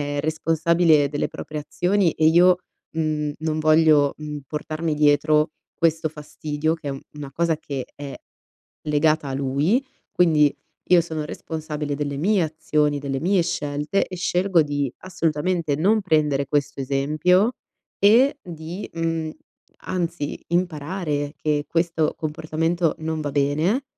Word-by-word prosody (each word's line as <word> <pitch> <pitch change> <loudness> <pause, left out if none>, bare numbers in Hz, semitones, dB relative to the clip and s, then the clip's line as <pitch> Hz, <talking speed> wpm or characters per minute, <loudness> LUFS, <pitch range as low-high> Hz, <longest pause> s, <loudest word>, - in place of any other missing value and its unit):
è 145 0 -2
responsabile 160 0 +2
delle 145 +1 -2
proprie 150 0 -6
azioni 180 +4 +1
e 155 - +2
io, 175 +2 +6 0.4
mhmm, 155 -2 -1
non 155 0 -2
voglio, 155 -2 +4
mhmm, 150 -1 -6
portarmi 155 +2 -3
dietro 150 +1 +3 0.2
questo 160 -1 +1
fastidio, 150 +1 -3
che 155 -3 -7
è - - -1
un 135 0 -6
una 145 -2 -7
cosa 165 +2 +1
che 135 -4 -5
è 140 -1 -7 0.7
legata 155 0 +1
a 135 - -3
lui, 140 - +1 0.3
quindi 155 -5 +4 0.4
io 180 -1 +7
sono 160 -2 -4
responsabile 150 -1 -5
delle 145 -1 -3
mie 190 +6 +2
azioni, 150 -2 0
delle 135 -1 -3
mie 185 +2 +2
scelte 150 +1 -1
e 185 - -7
scelgo 180 0 +2
di 145 -3 -2
assolutamente 165 -3 -1
non 205 +8 +3
prendere 150 -6 +1
questo 145 0 -1
esempio 155 - +2 0.5
e 240 +8 +5
di, 170 +2 -7
mhmm, 165 -1 -2 0.5
anzi, 170 -5 -3
imparare 160 -3 -1
che 150 -1 0
questo 165 -2 0
comportamento 160 +1 -1
non 160 0 -3
va 145 -1 -3
bene, 150 - +1
155 Hz, 135 wpm, -23 LUFS, 145-170 Hz, 0.7 s, io